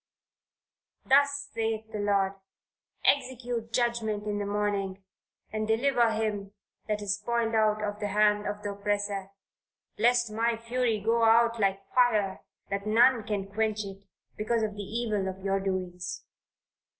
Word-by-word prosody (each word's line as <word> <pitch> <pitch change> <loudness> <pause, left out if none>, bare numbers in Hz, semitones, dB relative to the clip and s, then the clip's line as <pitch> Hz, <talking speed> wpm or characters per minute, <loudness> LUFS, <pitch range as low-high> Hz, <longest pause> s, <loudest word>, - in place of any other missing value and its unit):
"Thus 285 +1 +3
saith 220 -1 -2
the 210 - -4
Lord 200 -1 +2 0.7
execute 245 -4 0
judgment 235 -3 0
in 205 -1 -2
the 205 - -2
morning, 200 -2 -1 0.5
and 215 0 -1
deliver 235 +1 +3
him 210 -2 -2 0.3
that 210 -1 -1
is 200 0 0
spoiled 230 +1 -1
out 215 -1 +2
of 205 0 -3
the 205 - -2
hand 210 +1 +2
of 205 0 -4
the 205 - -2
oppressor, 200 -1 -2 0.7
lest 240 0 +3
my 230 +1 0
fury 230 -1 0
go 230 +3 +1
out 230 +1 +4
like 195 -1 0
fire 215 -6 +2 0.3
that 200 +1 -2
none 235 +3 +5
can 205 -2 -1
quench 215 +1 -1
it, 195 0 -9 0.3
because 220 +1 0
of 215 -1 -1
the 205 - -6
evil 210 -1 -2
of 190 0 -6
your 195 0 +1
doings." 185 -2 -3
215 Hz, 145 wpm, -28 LUFS, 200-230 Hz, 0.7 s, none